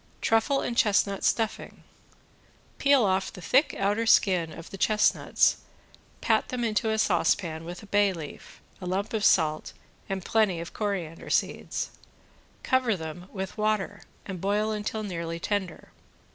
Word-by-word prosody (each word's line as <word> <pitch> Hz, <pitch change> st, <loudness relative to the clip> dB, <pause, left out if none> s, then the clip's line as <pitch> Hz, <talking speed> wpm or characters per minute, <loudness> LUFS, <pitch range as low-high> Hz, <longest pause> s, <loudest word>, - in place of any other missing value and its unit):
~TRUFFLE 225 Hz, +5 st, +2 dB
AND 240 Hz, -, -3 dB
CHESTNUT 200 Hz, -3 st, +2 dB
STUFFING~ 225 Hz, -2 st, -1 dB, 1.0 s
Peel 280 Hz, -5 st, +5 dB
off 190 Hz, 0 st, 0 dB
the -, -, -11 dB
thick 265 Hz, -, +2 dB
outer 205 Hz, +4 st, 0 dB
skin 180 Hz, -7 st, +4 dB
of 165 Hz, +1 st, -10 dB
the 195 Hz, -, -7 dB
chestnuts, 210 Hz, +1 st, +3 dB, 0.6 s
pat -, -, +2 dB
them 250 Hz, -2 st, -2 dB
into 220 Hz, -1 st, 0 dB
a 220 Hz, -, +1 dB
saucepan 170 Hz, -4 st, +1 dB
with 175 Hz, +4 st, -8 dB
a -, -, -10 dB
bay 205 Hz, 0 st, +3 dB
leaf, 160 Hz, -5 st, -9 dB, 0.2 s
a 180 Hz, -, -5 dB
lump 195 Hz, +5 st, -2 dB
of 215 Hz, -2 st, -1 dB
salt, 155 Hz, -5 st, +2 dB, 0.4 s
and 190 Hz, -2 st, -3 dB
plenty 210 Hz, -6 st, +2 dB
of 170 Hz, 0 st, -7 dB
coriander 190 Hz, -6 st, -4 dB
seeds. -, -, -1 dB, 0.7 s
Cover 255 Hz, -4 st, +2 dB
them 160 Hz, +2 st, -7 dB
with 190 Hz, +1 st, -6 dB
water, 210 Hz, -1 st, 0 dB, 0.2 s
and 190 Hz, -3 st, -6 dB
boil 210 Hz, +2 st, +1 dB
until 215 Hz, +1 st, -3 dB
nearly 170 Hz, -4 st, -4 dB
tender. 190 Hz, -2 st, -3 dB
200 Hz, 145 wpm, -27 LUFS, 175-215 Hz, 1.0 s, Peel